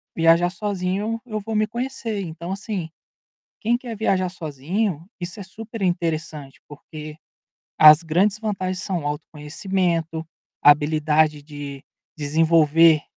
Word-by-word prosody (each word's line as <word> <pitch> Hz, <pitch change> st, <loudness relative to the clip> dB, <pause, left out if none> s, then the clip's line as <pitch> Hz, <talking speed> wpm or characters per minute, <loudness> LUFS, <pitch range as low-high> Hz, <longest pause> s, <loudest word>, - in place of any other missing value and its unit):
viajar 165 Hz, +1 st, +4 dB
sozinho 200 Hz, +3 st, -2 dB
eu 215 Hz, -3 st, -4 dB
vou 220 Hz, +2 st, -5 dB
me 215 Hz, 0 st, +2 dB
conhecer, 235 Hz, -3 st, -4 dB
então, 170 Hz, 0 st, -6 dB
assim, 195 Hz, -4 st, -4 dB, 0.7 s
quem 235 Hz, +2 st, +2 dB
quer 240 Hz, -3 st, -7 dB
viajar 185 Hz, -3 st, +1 dB
sozinho, 165 Hz, +2 st, -3 dB, 0.2 s
isso 175 Hz, +3 st, -6 dB
é -, -, -4 dB
super 220 Hz, +3 st, -9 dB
interessante, 165 Hz, -5 st, -2 dB
porque 150 Hz, +1 st, -10 dB, 0.6 s
as 155 Hz, +1 st, +9 dB
grandes 190 Hz, +6 st, +2 dB
vantagens 185 Hz, -4 st, -3 dB
são 175 Hz, -6 st, -3 dB
autoconhecimento, 160 Hz, +2 st, -2 dB, 0.4 s
habilidade 150 Hz, 0 st, +4 dB
de 145 Hz, -2 st, -8 dB, 0.3 s
desenvolver 160 Hz, +1 st, +4 dB
170 Hz, 115 wpm, -23 LUFS, 155-200 Hz, 0.7 s, as